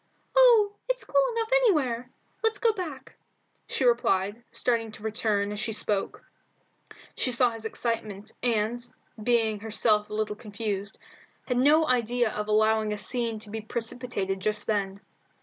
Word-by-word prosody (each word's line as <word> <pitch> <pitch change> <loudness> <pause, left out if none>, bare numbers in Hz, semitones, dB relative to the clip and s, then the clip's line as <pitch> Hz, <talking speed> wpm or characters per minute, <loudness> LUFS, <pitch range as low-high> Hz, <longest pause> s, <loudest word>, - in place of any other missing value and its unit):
"Oh, 455 -5 +6
it's - - 0
cool - - +2
enough 455 0 -2
anywhere! 285 - +2 0.3
Let's 445 0 +1
go 460 -2 +2
back," 310 -10 -7 0.5
she - - -1
replied, 220 -2 +1
starting 230 -3 -1
to 215 - -11
return 215 -2 0
as 210 - -4
she 220 - -1
spoke. 205 -2 -1 0.9
She 255 - 0
saw 245 0 +3
his 225 -1 -8
excitement, 220 -3 -3
and, 235 0 0 0.4
being 225 -2 +2
herself 215 0 +1
a 210 - -5
little 215 -1 -1
confused, 205 -2 -4 0.5
had 250 - 0
no 305 +5 +5
idea 240 -2 +1
of 210 0 -4
allowing 215 0 +2
a - - -4
scene 230 +2 -2
to 210 - -8
be 220 0 -4
precipitated 225 -3 -2
just 210 +2 +1
then. 200 -2 -1
225 Hz, 150 wpm, -27 LUFS, 210-250 Hz, 0.9 s, Oh